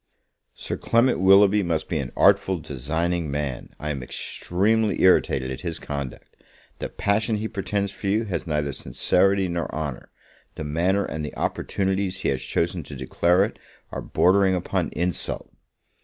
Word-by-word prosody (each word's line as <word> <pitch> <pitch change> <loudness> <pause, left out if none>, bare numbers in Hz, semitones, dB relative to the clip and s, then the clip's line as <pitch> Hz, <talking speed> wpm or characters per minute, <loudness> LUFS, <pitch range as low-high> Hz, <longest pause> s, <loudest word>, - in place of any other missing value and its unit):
Sir - - -4
Clement 120 +2 +2
Willoughby 100 +2 +6
must 85 -4 -1
be 80 - -1
an 65 -2 -4
artful 95 -1 +4
designing 80 +4 -2
man: 70 -3 -3
I 75 0 -3
am 70 -3 -4
extremely 105 - 0
irritated 65 -8 +3
at 65 - -6
his 85 -2 -3
conduct. 70 -4 -6 0.4
The - - -4
passion 110 +2 0
he 105 +1 -2
pretends 100 -1 -2
for 100 - -6
you 105 +4 +2
has 95 -5 -4
neither 75 -2 -1
sincerity 95 +6 +2
nor 85 -1 -3
honour; 75 -5 -5 0.5
the - - -5
manner 90 +7 +1
and 80 -1 -4
the 75 - -6
opportunities 95 -1 -1
he - - +1
has 65 -1 -1
chosen 85 +5 -1
to 70 - -8
declare 85 +8 +2
it, 110 - -8 0.3
are - - -4
bordering 95 +1 +3
upon 90 - -1
insult. 90 +1 -3
90 Hz, 155 wpm, -24 LUFS, 75-100 Hz, 0.5 s, Willoughby